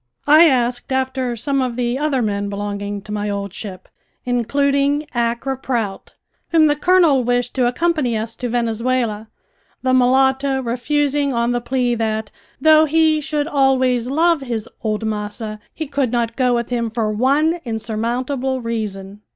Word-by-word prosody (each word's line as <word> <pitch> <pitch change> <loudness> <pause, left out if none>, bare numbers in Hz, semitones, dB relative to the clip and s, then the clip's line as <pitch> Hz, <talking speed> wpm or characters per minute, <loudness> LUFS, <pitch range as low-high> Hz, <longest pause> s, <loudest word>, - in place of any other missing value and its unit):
I 310 +3 +7
asked 245 -1 -1
after 260 -2 -1
some 275 +4 -1
of 250 -2 -2
the 245 +1 -1
other 285 -4 0
men 205 -1 -2
belonging 205 0 -4
to 215 - -10
my 210 0 -2
old 200 -2 -4
ship, 200 -3 -8 0.4
including 280 +4 +1
Accra 235 +2 -1
Prout, 230 -7 -3 0.3
whom 325 -2 +5
the 295 -1 +3
colonel 320 -4 +4
wished 245 0 0
to 250 -2 +2
accompany 275 -3 0
us 225 +1 -4
to 245 - -3
Venezuela, 230 -1 -1 0.5
the 255 0 +2
mulatto 265 +2 +3
refusing 280 +3 0
on 235 0 +1
the 245 0 -1
plea 250 0 0
that, 220 -2 -2 0.3
though 310 +2 +6
he 315 0 +3
should 300 0 -2
always 260 -4 +2
love 325 +3 +2
his 230 -4 -4
"old 215 0 -2
massa," 215 0 -4
he 315 - -5
could 275 -4 -1
not 235 -2 -1
go 250 -2 +2
with 235 0 -3
him 235 -2 -1
for 220 -1 -1
one 285 +9 +2
insurmountable 240 +4 -2
reason. 210 -4 -5
245 Hz, 155 wpm, -19 LUFS, 225-275 Hz, 0.5 s, I